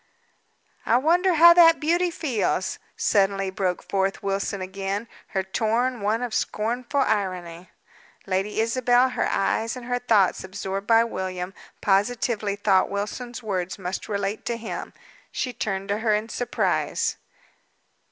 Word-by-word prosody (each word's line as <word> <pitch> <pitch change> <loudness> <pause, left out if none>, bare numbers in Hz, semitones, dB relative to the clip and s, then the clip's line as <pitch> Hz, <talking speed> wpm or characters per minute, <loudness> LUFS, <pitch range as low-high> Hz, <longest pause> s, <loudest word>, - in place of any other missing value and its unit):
"I 235 - +3
wonder 345 +6 +3
how 340 +2 +9
that 330 -1 +7
beauty 345 +3 +2
feels?" 235 - -1 0.2
suddenly 195 -1 +1
broke 185 -2 -2
forth 195 0 -1
Wilson 200 0 -2
again, 195 +3 -4 0.2
her 190 -1 -2
tone 230 +5 0
one 215 +4 0
of 240 -3 -4
scornful 240 +7 -1
irony. 185 -6 -2 0.6
Lady 195 +3 -1
Isabel, 245 +2 +3
her - - -1
eyes 225 +4 0
and 250 -1 -8
her 245 0 -1
thoughts 215 -7 +2
absorbed 195 +1 -5
by 230 0 +6
William, 185 -4 -4 0.3
positively 205 0 +1
thought 200 -2 +2
Wilson's 230 +5 -5
words 185 -4 -3
must 185 +1 -5
relate 200 0 -2
to 235 - -1
him. 225 -1 -6 0.4
She 250 - -3
turned 195 -3 -3
to 205 +1 0
her 220 -2 +2
in 215 +2 -3
surprise. 245 - -1
210 Hz, 135 wpm, -24 LUFS, 195-245 Hz, 0.6 s, how